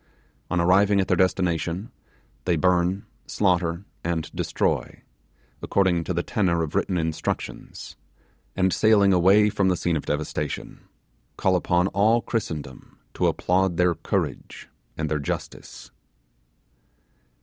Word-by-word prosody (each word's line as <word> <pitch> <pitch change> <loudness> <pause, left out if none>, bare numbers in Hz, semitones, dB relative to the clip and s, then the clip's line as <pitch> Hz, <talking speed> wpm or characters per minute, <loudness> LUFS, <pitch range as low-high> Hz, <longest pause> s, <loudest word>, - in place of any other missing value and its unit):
On 90 - 0
arriving 100 +4 +4
at 95 - +1
their - - +2
destination, 90 +1 0 0.5
they 90 -1 +2
burn, 90 +4 +1 0.2
slaughter, 90 -2 0 0.2
and 80 -3 -2
destroy, - - -2 0.6
according 90 -4 +1
to 90 - -2
the 85 - 0
tenor 85 -5 0
of 80 - -5
written 90 - 0
instructions, 80 -2 -4 0.6
and 95 -1 +2
sailing 105 -3 +4
away 100 +4 +5
from 100 -1 +1
the 90 -1 +2
scene 85 -2 0
of 75 - -4
devastation, 75 +1 -3 0.6
call 95 -1 +2
upon 90 0 +2
all 110 +5 +3
Christendom 80 - -5 0.2
to - - +1
applaud 90 -1 +1
their 90 -1 +3
courage - - -4 0.3
and 80 - -2
their 75 0 -1
justice. 70 - -6
90 Hz, 125 wpm, -24 LUFS, 85-95 Hz, 0.6 s, away